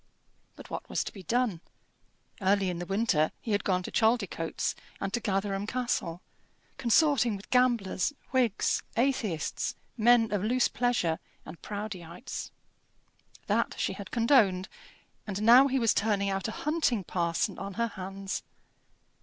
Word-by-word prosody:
But -, -, -13 dB
what -, -, -5 dB
was -, -, 0 dB
to -, -, -7 dB
be 195 Hz, -, -9 dB
done? 225 Hz, -3 st, 0 dB, 0.8 s
Early 195 Hz, -1 st, +2 dB
in 175 Hz, -, -5 dB
the 175 Hz, -, -5 dB
winter 195 Hz, -6 st, +2 dB
he 225 Hz, -, -5 dB
had 205 Hz, 0 st, +1 dB
gone 185 Hz, -2 st, +1 dB
to -, -, -6 dB
Chaldicotes 220 Hz, -8 st, 0 dB, 0.3 s
and 195 Hz, 0 st, -3 dB
to 240 Hz, -, +1 dB
Gatherum 195 Hz, -2 st, -1 dB
Castle, 235 Hz, -9 st, -2 dB, 0.6 s
consorting 255 Hz, -2 st, +3 dB
with 195 Hz, -, -11 dB
gamblers, 240 Hz, -5 st, +2 dB, 0.2 s
Whigs, 245 Hz, -6 st, +2 dB, 0.2 s
atheists, 230 Hz, -, 0 dB, 0.2 s
men 230 Hz, 0 st, +5 dB
of 205 Hz, -2 st, 0 dB
loose 245 Hz, +4 st, +3 dB
pleasure, 235 Hz, -10 st, 0 dB, 0.3 s
and 165 Hz, -, -10 dB
Proudieites. 205 Hz, +1 st, -6 dB, 1.0 s
That -, -, 0 dB
she -, -, -1 dB
had 200 Hz, -2 st, -8 dB
condoned; 225 Hz, -6 st, +3 dB, 0.6 s
and 205 Hz, +1 st, -3 dB
now 245 Hz, +5 st, +8 dB
he 265 Hz, 0 st, 0 dB
was 230 Hz, -4 st, +3 dB
turning 200 Hz, -2 st, +1 dB
out 195 Hz, -2 st, -2 dB
a -, -, -3 dB
hunting 300 Hz, -, +1 dB
parson 170 Hz, -2 st, -1 dB
on 195 Hz, -1 st, -6 dB
her 235 Hz, 0 st, 0 dB
hands. 195 Hz, -1 st, -5 dB
205 Hz, 145 wpm, -29 LUFS, 190-240 Hz, 1.0 s, now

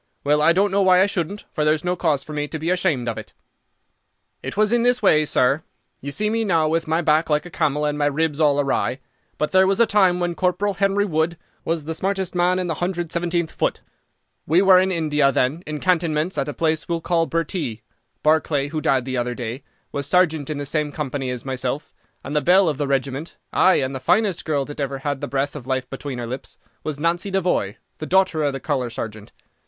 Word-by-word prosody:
Well, 150 Hz, +1 st, +2 dB
I 160 Hz, +2 st, +5 dB
don't 195 Hz, +3 st, +2 dB
know 200 Hz, +1 st, +2 dB
why 185 Hz, -1 st, +5 dB
I 190 Hz, -, +6 dB
shouldn't, 200 Hz, 0 st, -3 dB
for 155 Hz, -, 0 dB
there's 155 Hz, 0 st, +2 dB
no 180 Hz, 0 st, 0 dB
cause 155 Hz, -6 st, 0 dB
for 155 Hz, -, -9 dB
me 150 Hz, 0 st, -2 dB
to 160 Hz, -, -5 dB
be 160 Hz, +3 st, -1 dB
ashamed 170 Hz, -9 st, 0 dB
of 115 Hz, -, -2 dB
it. -, -, -12 dB, 1.1 s
"It -, -, -6 dB
was 215 Hz, 0 st, +3 dB
in 240 Hz, -, +3 dB
this 245 Hz, +1 st, +2 dB
way, 155 Hz, 0 st, +4 dB
sir. 140 Hz, +1 st, +2 dB, 0.4 s
You 140 Hz, -, -6 dB
see 210 Hz, +9 st, -1 dB
me 225 Hz, +1 st, 0 dB
now 165 Hz, -6 st, +2 dB
with 165 Hz, +1 st, 0 dB
my 160 Hz, +2 st, +1 dB
back 155 Hz, +1 st, +2 dB
like 150 Hz, +1 st, +1 dB
a 175 Hz, -, -10 dB
camel 150 Hz, -1 st, 0 dB
and 150 Hz, 0 st, -1 dB
my 145 Hz, -, +2 dB
ribs 150 Hz, +1 st, 0 dB
all 145 Hz, -2 st, +3 dB
awry, 135 Hz, -1 st, 0 dB, 0.4 s
but 150 Hz, -, -1 dB
there 190 Hz, 0 st, +5 dB
was 195 Hz, +2 st, +1 dB
a 235 Hz, -, +6 dB
time 190 Hz, -4 st, +3 dB
when 175 Hz, -1 st, -1 dB
Corporal 185 Hz, +3 st, 0 dB
Henry 195 Hz, +1 st, +1 dB
Wood 160 Hz, -2 st, 0 dB, 0.3 s
was 165 Hz, -2 st, -2 dB
the 160 Hz, -, -3 dB
smartest 190 Hz, +1 st, -2 dB
man 180 Hz, +1 st, +2 dB
in 185 Hz, -, -1 dB
the 170 Hz, -, -1 dB
117th 175 Hz, -1 st, -1 dB
Foot. -, -, -1 dB, 0.7 s
We 165 Hz, +4 st, +4 dB
were 190 Hz, -1 st, +7 dB
in 190 Hz, +1 st, +1 dB
India 150 Hz, -5 st, +2 dB
then, 135 Hz, +5 st, 0 dB
in 155 Hz, -1 st, -4 dB
cantonments, 165 Hz, -1 st, +1 dB
at 140 Hz, -, -1 dB
a -, -, -1 dB
place 160 Hz, 0 st, -1 dB
we'll 170 Hz, -1 st, -1 dB
call 165 Hz, -1 st, +1 dB
Bhurtee. 165 Hz, -, -3 dB, 0.4 s
Barclay, 150 Hz, -2 st, +2 dB
who 155 Hz, 0 st, -3 dB
died 130 Hz, -3 st, +1 dB
the 130 Hz, -1 st, -3 dB
other 120 Hz, 0 st, -1 dB
day, 120 Hz, +2 st, -5 dB, 0.3 s
was 140 Hz, -1 st, -3 dB
sergeant 160 Hz, -4 st, +2 dB
in 155 Hz, -, -3 dB
the 145 Hz, -, -4 dB
same 150 Hz, +1 st, -1 dB
company 140 Hz, -3 st, -3 dB
as 125 Hz, 0 st, -5 dB
myself, 130 Hz, +2 st, -3 dB, 0.3 s
and 145 Hz, -, -5 dB
the 150 Hz, -, +3 dB
belle 185 Hz, +3 st, +5 dB
of 150 Hz, -3 st, -1 dB
the 145 Hz, -, 0 dB
regiment, 135 Hz, +3 st, -2 dB, 0.2 s
ay, 185 Hz, -, +5 dB
and 130 Hz, 0 st, 0 dB
the 130 Hz, -, -4 dB
finest 200 Hz, -, +1 dB
girl 145 Hz, -3 st, 0 dB
that 145 Hz, +1 st, -9 dB
ever 140 Hz, -1 st, -2 dB
had 140 Hz, 0 st, -3 dB
the -, -, -3 dB
breath 140 Hz, +1 st, -2 dB
of 130 Hz, -4 st, -8 dB
life 130 Hz, -1 st, -1 dB
between 135 Hz, -1 st, -5 dB
her 120 Hz, -, -4 dB
lips, 130 Hz, +3 st, -7 dB, 0.3 s
was 150 Hz, -2 st, -4 dB
Nancy 170 Hz, +5 st, 0 dB
Devoy, 180 Hz, -, 0 dB, 0.2 s
the 155 Hz, -, -5 dB
daughter 190 Hz, -4 st, +2 dB
of 145 Hz, -, +1 dB
the 135 Hz, -, -4 dB
colour 130 Hz, -3 st, -1 dB
sergeant. 110 Hz, -2 st, -7 dB
155 Hz, 230 wpm, -22 LUFS, 140-180 Hz, 1.1 s, were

